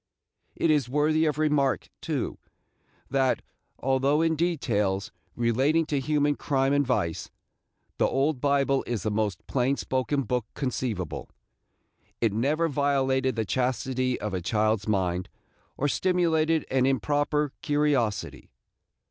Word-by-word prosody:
It 165 - +2
is 145 -5 +1
worthy 155 +3 +2
of 150 -2 0
remark, 150 -3 +1
too, - - -3 0.7
that, 135 -2 +1 0.3
although 135 +4 +2
in 165 -1 +2
details 110 - 0 0.2
relating 135 +8 +2
to 145 -2 -1
human 145 +1 +1
crime 135 -1 +1
and 145 0 +3
vice, 85 - -1 0.7
the - - +4
Old 135 0 0
Bible 140 -1 +2
is 115 -6 -2
the 110 - -1
most 105 -3 -2
plain 135 +1 0
spoken 130 +2 -1
book 125 -3 -2
conceivable, 120 - -3 0.9
it 115 -4 +1
never 145 +9 +1
violated 135 -2 +1
the 110 -1 -1
chastity 130 +1 -1
of 105 -2 -4
a 95 - -2
child's 110 +2 0
mind, 90 -3 0 0.5
or 145 - +1
stimulated 165 -1 +1
an 130 0 +3
improper 145 +3 +1
curiosity. 145 -8 0
135 Hz, 125 wpm, -27 LUFS, 115-150 Hz, 0.9 s, the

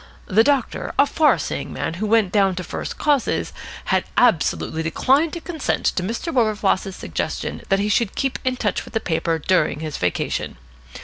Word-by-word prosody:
The 215 +4 +4
doctor, 275 -2 0
a 280 - +6
far 305 +1 +3
seeing - - -4
man - - -3
who 215 - 0
went 215 -3 +3
down 195 -3 +3
to 180 - -4
first - - -5
causes, 290 -4 +1 0.3
had - - +1
absolutely 165 -7 +2
declined 270 - +2
to 340 - -5
consent 320 -5 -2
to - - 0
Mr. 230 - -3
Wilberfloss's 210 -5 +1
suggestion 85 - -4
that 195 - +4
he 200 +1 0
should 210 0 +1
keep 270 -1 -1
in 255 0 0
touch 210 -5 -1
with - - -13
the - - +3
paper 165 -3 -1
during 155 -2 +1
his 155 -2 -4
vacation. 90 -7 -2
210 Hz, 180 wpm, -22 LUFS, 180-260 Hz, 0.3 s, a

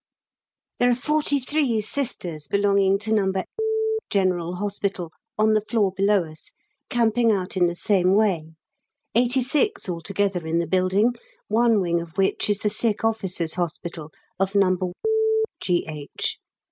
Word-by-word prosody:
There 245 - +4
are 245 - +3
43 285 -2 0
Sisters 195 - -4
belonging 200 +1 +3
to 215 +2 -2
No. 195 -3 +2 0.8
General 180 -3 0
Hospital 195 -3 -3 0.3
on 215 0 +3
the 215 - +3
floor 210 -2 +1
below 200 -1 +3
us 155 -1 -12 0.4
camping 230 -1 +2
out 190 -2 -2
in 180 -2 +3
the 175 - -3
same 185 0 +2
way 170 -7 +1 0.6
86 255 - +1
altogether 185 0 -2
in 165 +1 0
the 170 - +1
building, 185 +7 +2 0.4
one 230 0 +3
wing 170 -2 0
of 170 +2 -11
which 195 +2 +1
is 205 - +2
the 210 - -2
Sick 215 0 0
Officers' 190 -7 -1
Hospital 170 -2 -4 0.3
of 195 +1 0
No. 190 -2 +4 0.8
G.H. 155 -5 -2
195 Hz, 135 wpm, -24 LUFS, 175-220 Hz, 0.8 s, There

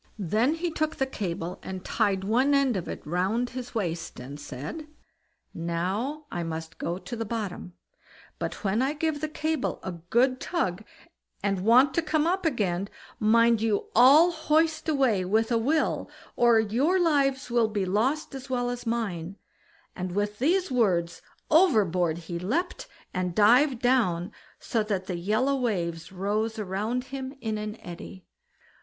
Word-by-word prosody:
Then 220 - +1
he 335 +1 -2
took 310 0 -1
the 270 - 0
cable 180 -8 -4
and 185 -1 -7
tied 195 -2 +1
one 255 +8 +3
end 275 -4 +2
of 185 - -3
it - - -7
round 190 +10 0
his 245 -1 -7
waist, 170 -5 -3
and 135 +4 -8
said: 150 - -7 0.7
"Now, 190 - -2
I 175 - -3
must 165 0 -6
go 170 +2 -2
to 235 - -7
the 230 - -3
bottom, 205 -5 -5 0.7
but - - -4
when 210 +3 +1
I 270 +3 +1
give 310 -1 -2
the 310 - -2
cable 310 -2 -2
a 190 - -3
good 235 +10 +1
tug, 220 - -1 0.6
and 195 -2 0
want 255 +6 +5
to 335 - +2
come 310 -1 +1
up 360 0 +1
again, 200 - -1 0.3
mind 230 +1 +4
you 220 -2 0
all 285 +9 +7
hoist 315 0 +1
away 260 -10 +2
with 220 +5 +1
a 230 - +3
will, 300 +7 0 0.3
or 235 -2 +5
your 255 - +2
lives 280 -6 +1
will 235 -2 +3
be 210 -3 -1
lost 250 - 0
as 270 0 -8
well 245 -1 0
as 245 -1 -6
mine"; 200 -6 -2 0.6
and 185 -1 -4
with 205 +1 -2
these 350 +5 +2
words 180 -9 +1 0.3
overboard 195 - +3
he 170 0 -4
leapt, 305 - -2 0.3
and 180 -1 -2
dived 245 +5 +4
down, 215 -8 +2 0.3
so 230 - -1
that 200 -3 -2
the 180 -2 -3
yellow 220 +10 +1
waves 175 -9 -2
rose 210 +4 -1
round 215 +5 -2
him 265 0 -5
in 220 -3 -3
an 210 +1 -5
eddy. 175 +1 -9
225 Hz, 160 wpm, -27 LUFS, 185-270 Hz, 0.7 s, all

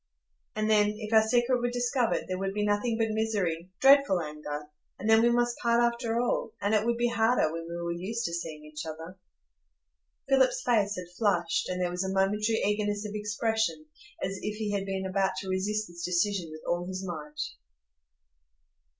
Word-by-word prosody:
And 215 0 0
then, 210 -1 +3
if 215 0 -5
our 220 - +8
secret 240 +3 +2
were 245 0 0
discovered, 245 0 0
there 185 0 -3
would 195 0 -2
be 210 0 0
nothing 210 +3 +1
but 225 -1 +1
misery,—dreadful 205 +3 +3
anger; 150 -2 -5 0.3
and 210 - -5
then 220 0 +6
we 235 - +5
must 240 0 +1
part 235 -1 +2
after 235 -1 +1
all, 240 -2 -1
and 205 +2 0
it 215 +1 +2
would 235 0 +1
be 240 0 +2
harder, 225 -8 +2
when 165 0 -5
we 170 - -5
were 170 0 -3
used 200 +7 -3
to 170 - -2
seeing 160 -3 -5
each 150 0 -7
other." 160 +3 -7 1.1
Philip's 265 -1 +3
face 210 -4 +2
had 180 -1 -8
flushed, 175 -6 +1
and 180 0 -2
there 180 -1 0
was 180 +1 -2
a 190 - -2
momentary 210 +3 +1
eagerness 205 0 0
of 205 - -7
expression, 220 +6 -1 0.4
as 195 +1 -2
if 210 0 -3
he 215 -1 -2
had 200 -1 -2
been 190 0 -2
about 190 0 +1
to 190 - -7
resist 210 +3 -1
this 170 0 -9
decision 180 0 0
with 155 0 -9
all 175 +1 -1
his 185 0 -4
might. 150 -4 -7
205 Hz, 190 wpm, -29 LUFS, 180-225 Hz, 1.1 s, our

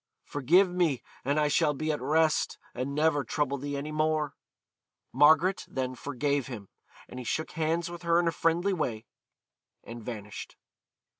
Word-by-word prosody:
Forgive 170 +8 +4
me 175 -7 0 0.2
and 140 +3 +1
I 150 - +3
shall 150 0 +2
be 155 +3 -1
at 150 - -3
rest, 155 +3 +2 0.2
and 130 +3 -3
never 150 -1 +2
trouble 140 +2 -1
thee 145 +1 -3
any 145 +2 -4
more.' 155 -1 0 0.8
Margaret 160 +6 +5
then 130 -1 -2
forgave 140 +1 -1
him, 110 -7 -8 0.4
and 125 - -8
he - - -5
shook 155 +7 -2
hands 165 +2 0
with 175 0 -8
her 170 0 +3
in 175 - +1
a - - +3
friendly 170 +4 +1
way, 120 -11 -2 0.8
and 115 0 -9
vanished. 105 -3 -7
150 Hz, 160 wpm, -29 LUFS, 135-160 Hz, 0.8 s, Margaret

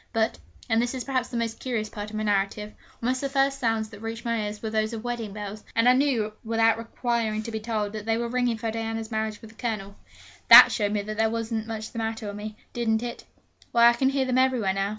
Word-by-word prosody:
But 225 - 0 0.3
and 225 +1 +3
this 245 +2 -2
is 255 - -3
perhaps 260 -2 -1
the 240 - -4
most 230 -1 -2
curious 235 -4 -2
part 210 0 -7
of 215 - -8
my 215 - -2
narrative 205 +1 -1 0.3
almost 255 +2 0
the 275 - -1
first 275 0 +1
sounds 225 -3 0
that 205 -2 -12
reached 225 +1 -6
my 230 -2 0
ears 210 0 -6
were 220 - -3
those 220 +1 0
of 225 -1 -5
wedding 240 -3 -3
bells; 210 +1 -7
and 230 +1 +4
I 250 - +8
knew, 255 -6 +1
without 225 0 +2
requiring 230 -2 -1
to 230 - -6
be 220 - -3
told, 215 -2 -2
that 215 0 -6
they 225 0 +2
were 235 0 -2
ringing 245 -1 0
for 225 0 -3
Diana's 225 0 -4
marriage 220 -1 -2
with 220 - -11
the 220 - -22
Colonel. 205 -4 -3 0.5
That - - +11
showed 210 -2 0
there 215 +2 0
wasn't 225 -1 -3
much 220 -1 -5
the 230 - -5
matter 225 0 -3
with 205 -1 -5
me, 210 +1 -7 0.2
didn't 225 -2 0
it? 240 -1 -6 0.5
Why, 235 0 +7
I - - +3
can 265 +2 +2
hear 270 -1 0
them 255 0 +2
everywhere 250 -7 +2
now. 195 +1 -1
225 Hz, 245 wpm, -26 LUFS, 215-235 Hz, 0.5 s, That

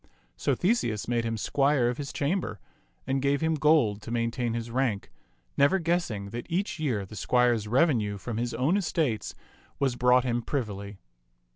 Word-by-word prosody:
So - - 0
Theseus 175 - 0
made 120 -1 0
him 115 0 -2
squire 135 +2 +2
of 120 +2 -2
his 140 -2 -4
cham 155 +7 0
ber, 105 - -6 0.5
and 135 0 0
gave 140 +1 +1
him 160 0 +1
gold 150 -9 +3
to 105 - -9
maintain 115 0 -1
his 115 0 -4
rank, 120 -5 -1 0.5
never 140 +7 +4
guessing 165 - -1
that 120 +1 -6
each 180 0 -2
year 120 -10 -1
the 110 - -11
squire's 120 +1 +2
revenue 115 -5 +2
from 110 +3 -5
his 120 0 -2
own 140 - +2
estates 150 - -1 0.4
was 135 -3 0
brought 125 0 +4
him 120 -1 0
privily. 105 -6 -4
125 Hz, 170 wpm, -28 LUFS, 110-145 Hz, 0.5 s, never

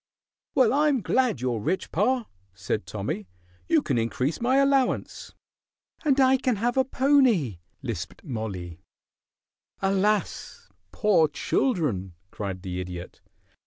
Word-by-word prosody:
"Well, 250 -3 +4
I 300 +2 +3
am 275 -5 +2
glad 245 - +1
you're 125 -3 -1
rich, 185 - -2
pa," 240 +6 +1 0.3
said 100 +3 -3
Tommy; 105 -1 -4 0.4
"you - - +3
can 120 - 0
increase 125 - -1
my 250 +2 +2
allowance." 275 -1 +1 0.7
"And 280 -3 +3
I 265 0 +5
can 255 -2 0
have 240 +4 0
a 265 - +4
pony," 255 - +2 0.2
lisped 100 -8 -5
Mollie. 100 - -5 1.0
"Alas! 195 +2 -1 0.2
Poor 200 -7 +3
children!" 145 - -1 0.2
cried 95 -3 -5
the 90 -2 -4
Idiot. 90 -1 -8
185 Hz, 125 wpm, -26 LUFS, -, 1.0 s, I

